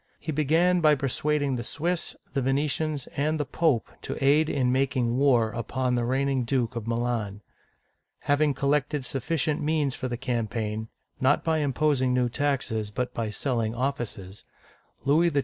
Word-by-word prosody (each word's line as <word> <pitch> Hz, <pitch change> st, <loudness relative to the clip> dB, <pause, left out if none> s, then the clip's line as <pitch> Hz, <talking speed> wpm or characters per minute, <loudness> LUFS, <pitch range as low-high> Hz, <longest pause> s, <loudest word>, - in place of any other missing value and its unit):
He 160 Hz, -, -4 dB
began 165 Hz, +5 st, +3 dB
by 155 Hz, -2 st, +6 dB
persuading 140 Hz, 0 st, 0 dB
the 120 Hz, -, -4 dB
Swiss, 170 Hz, +7 st, -2 dB, 0.2 s
the 140 Hz, -, 0 dB
Venetians, 145 Hz, +2 st, 0 dB
and 155 Hz, +2 st, 0 dB
the 145 Hz, -, 0 dB
Pope 140 Hz, -3 st, +1 dB
to 135 Hz, -, -5 dB
aid 150 Hz, +3 st, +4 dB
in 125 Hz, -3 st, +1 dB
making 130 Hz, -2 st, +1 dB
war 125 Hz, -5 st, +3 dB
upon 125 Hz, +2 st, -2 dB
the 120 Hz, -1 st, +1 dB
reigning 135 Hz, +1 st, +1 dB
Duke 120 Hz, -1 st, 0 dB
of 115 Hz, -1 st, -4 dB
Milan. 115 Hz, -4 st, -2 dB, 0.8 s
Having 145 Hz, 0 st, +2 dB
collected 140 Hz, 0 st, 0 dB
sufficient 150 Hz, +4 st, -1 dB
means 150 Hz, -3 st, +1 dB
for 130 Hz, -, -4 dB
the 120 Hz, -1 st, -3 dB
campaign, 115 Hz, -3 st, -2 dB, 0.2 s
— -, -, -32 dB
not 135 Hz, +3 st, +3 dB
by 160 Hz, -1 st, +1 dB
imposing 140 Hz, -3 st, +1 dB
new 125 Hz, -1 st, +2 dB
taxes, 125 Hz, -6 st, -1 dB
but 125 Hz, +4 st, -3 dB
by 115 Hz, -2 st, -2 dB
selling 115 Hz, 0 st, -1 dB
offices, 120 Hz, -7 st, -4 dB, 0.3 s
— -, -, -36 dB
Louis 160 Hz, +5 st, +4 dB
XII. 145 Hz, -, +2 dB
135 Hz, 165 wpm, -27 LUFS, 120-145 Hz, 0.8 s, by